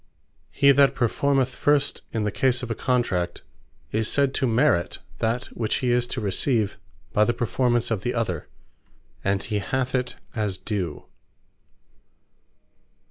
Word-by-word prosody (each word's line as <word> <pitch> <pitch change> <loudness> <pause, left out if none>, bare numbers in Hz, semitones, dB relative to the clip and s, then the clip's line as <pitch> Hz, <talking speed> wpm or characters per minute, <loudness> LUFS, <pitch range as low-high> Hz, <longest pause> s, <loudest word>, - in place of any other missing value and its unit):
Merit - - -41
What - - -30
He 140 0 +8
that 140 0 +4
performeth 130 +2 +1
first 145 -1 +2
in 110 - -1
the 105 - 0
case 130 +3 +1
of 120 - -4
a - - +2
Contract, 105 -9 -1 0.5
is 110 0 +1
said 140 -1 +2
to 135 - +1
MERIT 115 -6 +2 0.2
that 120 +3 0
which 110 -2 -1
he 125 -2 0
is 120 0 +2
to 130 - -3
receive 105 +1 0 0.3
by 105 - +4
the 120 +2 +1
performance 120 0 0
of 105 -4 0
the 125 +4 -2
other; 90 -9 -2 0.8
and 100 0 +1
he 105 -2 -1
hath 130 +5 -2
it 125 -1 0 0.2
as 105 -4 -2
Due. 95 -9 -4
120 Hz, 155 wpm, -24 LUFS, 105-130 Hz, 0.8 s, He